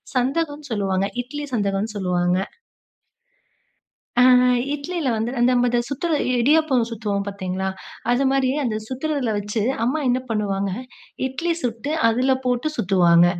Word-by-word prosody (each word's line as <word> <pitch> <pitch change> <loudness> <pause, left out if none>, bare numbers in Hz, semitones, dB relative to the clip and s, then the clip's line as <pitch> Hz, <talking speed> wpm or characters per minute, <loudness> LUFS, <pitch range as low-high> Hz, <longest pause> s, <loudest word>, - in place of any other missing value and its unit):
சந்தகம்னு 290 +2 -1
சொல்லுவாங்க. 195 -2 0 0.2
இட்லி 295 +4 -6
சந்தகம்னு 200 +1 -1
சொல்லுவாங்க. 180 -1 +1 1.8
அ - - +7 0.5
இட்லில 310 0 -3
வந்து 225 +2 -1
அந்த 240 +1 +4
நம்ப 245 0 +3
அத 240 0 +2
சுத்துற 310 +5 -2 0.3
இடியாப்பம் 270 -3 +3
சுத்துவோம் 205 -3 -2
பார்த்தீங்களா, 190 -1 -3 0.4
அது 255 +3 +2
மாரி 270 -1 +2 0.2
அந்த 220 -3 -1
சுத்துறதில 265 -2 -2
வச்சு 205 +1 -2 0.2
அம்மா 275 +6 +1
என்ன 250 +1 +3
பண்ணுவாங்க, 200 -2 -1 0.6
இட்லி 335 +6 -1
சுட்டு 240 +4 -3 0.2
அதில 255 +3 +2
போட்டு 250 +4 0
சுத்துவாங்க. 175 -5 +4
235 Hz, 125 wpm, -22 LUFS, 200-270 Hz, 1.8 s, அ